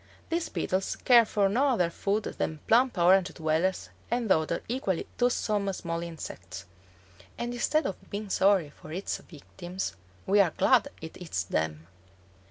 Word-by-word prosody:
These 335 0 -1
beetles 185 +1 -1
care 240 -2 +6
for 205 -2 +2
no 245 +9 +2
other 180 -11 +2
food 205 +4 -1
than 160 - -3
plump 245 -1 +4
Orange 185 +1 +4
dwellers 160 +3 0 0.2
and 235 -3 0
other 160 0 +1
equally 225 -8 -1
toothsome 210 -5 +1
small 170 -2 -4
insects; 95 - -8 0.7
and 240 0 -3
instead 305 +6 +1
of 190 - -5
being 205 0 -5
sorry 190 -7 +3
for 155 - -13
its 185 +5 -3
victims, 175 - -7 0.3
we 205 +2 +3
are 185 -5 +3
glad 260 +1 +4
it 160 +3 -9
eats 95 - -2
them! 80 -2 -2
190 Hz, 150 wpm, -28 LUFS, 165-225 Hz, 0.7 s, care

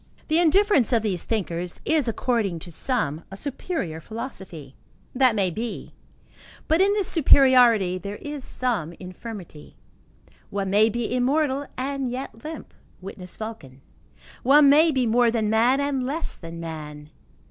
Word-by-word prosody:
The 315 +2 +3
indifference 350 - +3
of 230 -3 +2
these 190 -6 -1
thinkers, 180 -5 -3
is, 310 -5 +2
according 225 -5 -1
to 175 - -10
some, 165 - -1
a 195 - -9
superior 255 - -4
philosophy. 190 - -8 0.4
That 255 -3 +3
may 190 -4 +1
be; 225 +6 -6 0.7
but 320 +3 +3
in 395 +1 +4
this 410 -3 0
superiority 250 - +5
there 200 +2 -6
is 290 +3 -7
some 225 -14 -2
infirmity. 185 -3 -10 0.7
One 195 -1 -3
may 215 +3 +5
be 240 +2 -2
immortal 275 +2 0
and 270 0 -2
yet 245 -3 -7
limp: 315 +1 -8 0.3
witness 185 -1 -9
Vulcan. 160 - -8 0.6
One 280 +2 +6
may 315 +3 +6
be 260 -5 +1
more 235 +1 +3
than 220 -2 0
man 240 +5 +3
and 280 -2 -1
less 290 +6 -3
than 165 -1 -9
man. 150 -2 -8
230 Hz, 145 wpm, -24 LUFS, 185-275 Hz, 0.7 s, One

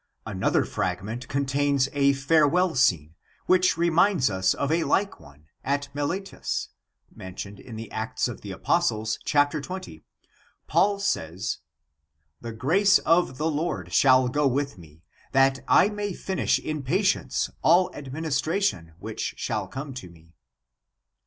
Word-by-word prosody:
Another - - 0
fragment 105 +7 -3
contains 140 0 +1
a 140 -1 +3
farewell 160 +5 +2
scene, 80 - +2 0.3
which 185 -2 +3
re 170 0 +2
minds 165 - +3
us 95 0 +1
of 140 +1 -2
a 165 +1 +2
like 200 +4 0
one, 70 +2 -18 0.2
at 140 +1 -1
Miletus, 170 +7 -3 0.4
mentioned 100 +2 -8
in 120 - -10
the 110 0 -8
Acts 110 0 -2
of - - -7
the - - -9
Apostles, 110 +1 0
chap. 145 -1 +3
xx. 150 - -6 0.6
Paul 200 0 +2
says: 95 - -2 0.4
" 75 0 -49
The 115 - -6
grace 185 - +3
of 165 -5 +1
the 155 +3 0
Lord 145 - -3
shall 130 -2 +5
go 145 +3 +1
with 140 +2 -1
me, 80 -3 -17 0.3
that 135 0 +4
I 200 - +5
may 205 -2 -4
finish 190 +1 0
in 155 -1 -4
patience 180 - 0
all 175 +3 +4
administration, 145 - -2
which - - -5
shall - - -2
come 135 +1 -7
to 110 -8 -8
me." 85 0 -20
140 Hz, 140 wpm, -25 LUFS, 105-165 Hz, 0.6 s, shall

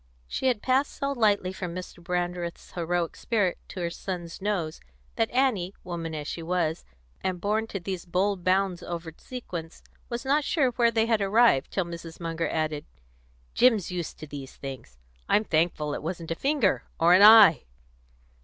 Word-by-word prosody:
She 265 - -1
had 240 -5 +1
passed 265 +2 +2
so 275 0 -2
lightly 205 -7 +2
from 180 -2 -5
Mr. 180 -1 -8
Brandreth's 175 -1 -3
heroic 175 -1 -1
spirit 205 -6 0
to 185 - -7
her 170 -1 -1
son's 175 -1 -6
nose 190 -6 -2 0.3
that 225 - +1
Annie, 230 -8 +1
woman 165 -3 -5
as 150 -1 -5
she 165 - -4
was, 165 -1 -1 0.4
and 185 -1 -1
born 215 +4 0
to 200 - -4
these 185 0 -5
bold 185 +1 0
bounds 185 -1 +1
over 165 -2 -6
sequence, 175 -11 -8 0.3
was 240 +2 -4
not 290 +3 +2
sure 275 -4 +2
where 235 0 +3
they 225 -1 +2
had 225 -2 +1
arrived, 200 - +4
till 190 - -1
Mrs. 170 -1 -8
Munger 165 -1 -2
added: 155 -2 -2 0.7
"Jim's 225 -7 +3
used 175 -2 -4
to - - -8
these 140 -2 -9
things. 130 - -9 0.3
I'm 210 - +4
thankful 155 -4 0
it - - -4
wasn't 165 0 -5
a - - 0
finger, 275 - +1 0.2
or 170 +2 +6
an 185 - +6
eye. 210 -6 +9
180 Hz, 170 wpm, -27 LUFS, 165-220 Hz, 0.7 s, eye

